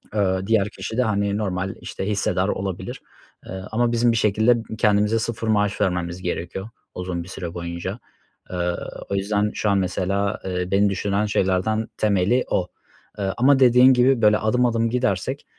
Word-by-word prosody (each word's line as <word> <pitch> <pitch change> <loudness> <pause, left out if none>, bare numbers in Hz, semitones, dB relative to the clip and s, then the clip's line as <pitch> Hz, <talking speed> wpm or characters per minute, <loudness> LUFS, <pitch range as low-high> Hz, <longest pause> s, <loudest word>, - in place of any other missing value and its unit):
Iıı, 95 -1 0
diğer 105 -3 +2
kişi 115 +1 -6
de, 125 - +3
hani, 100 -2 0
normal, 95 -2 -2
işte, 95 - -5
hissedar 100 -2 0
olabilir. 95 -2 -4 0.4
Eee, - - -10 0.2
ama 120 +2 +1
bizim 120 0 +3
bir 115 - 0
şekilde 110 +3 +3 0.2
kendimize 105 +1 +2
0 115 0 -3
maaş 105 -1 +1
vermemiz 90 -2 -1
gerekiyor 90 +3 -4 0.3
uzun 90 -2 -4
bir - - -13
süre 85 -3 -6
boyunca. 85 +5 -5 0.5
Iıı, 90 -1 -1 0.3
o 100 - -1
yüzden 105 +2 0
şu 105 - 0
an 100 - +3
mesela, 95 +2 -1
eee, 90 -1 -3
beni 100 +1 +3
düşündüren 100 +2 0
şeylerden 105 +2 0
temeli 105 +4 +2
o. 90 - 0 0.5
Iıı, 95 -1 -1
ama 135 +2 +4
dediğin 125 0 +7
gibi 125 0 +3
böyle 105 -1 +5
adım 125 +3 +1
adım 115 -1 +1
gidersek 125 +2 -1
100 Hz, 165 wpm, -22 LUFS, 95-115 Hz, 0.5 s, dediğin